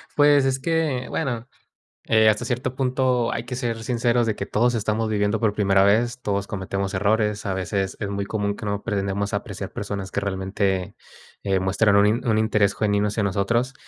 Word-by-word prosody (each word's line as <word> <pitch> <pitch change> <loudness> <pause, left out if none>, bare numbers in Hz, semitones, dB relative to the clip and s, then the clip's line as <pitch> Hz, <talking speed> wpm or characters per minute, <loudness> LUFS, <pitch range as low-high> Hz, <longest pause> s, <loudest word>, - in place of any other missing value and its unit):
Pues, 145 -2 +5
es 135 0 0
que, 155 -4 -1
bueno, 120 -2 -3 0.6
eh, 110 -1 +5
hasta 105 0 +2
cierto 125 0 -2
punto 130 -2 +1
hay 115 - -3
que 125 - -6
ser 115 -3 -3
sinceros 120 0 +1
de 110 - 0
que - - -4
todos 120 +2 +1
estamos 110 0 -1
viviendo 105 +1 0
por 110 -3 +2
primera 100 -2 +3
vez, 120 +5 +2
todos 100 -1 -1
cometemos 100 0 -3
errores. 105 +2 +1
A 95 - -1
veces 95 +1 -2
es 100 - -2
muy 100 0 -2
común 105 -1 -2
que - - -8
no 100 0 -2
pretendemos 100 -1 -2
apreciar - - -5
personas 100 -2 -5
que 100 - -2
realmente, 95 0 -2 0.5
eh, 95 -2 +1
muestran 100 +2 +2
un 105 +5 +3
un 110 -2 +2
interés 105 -2 +2
genuino 105 -1 +1
hacia 105 +1 -1
nosotros. 115 +7 0
105 Hz, 185 wpm, -23 LUFS, 100-120 Hz, 0.6 s, Pues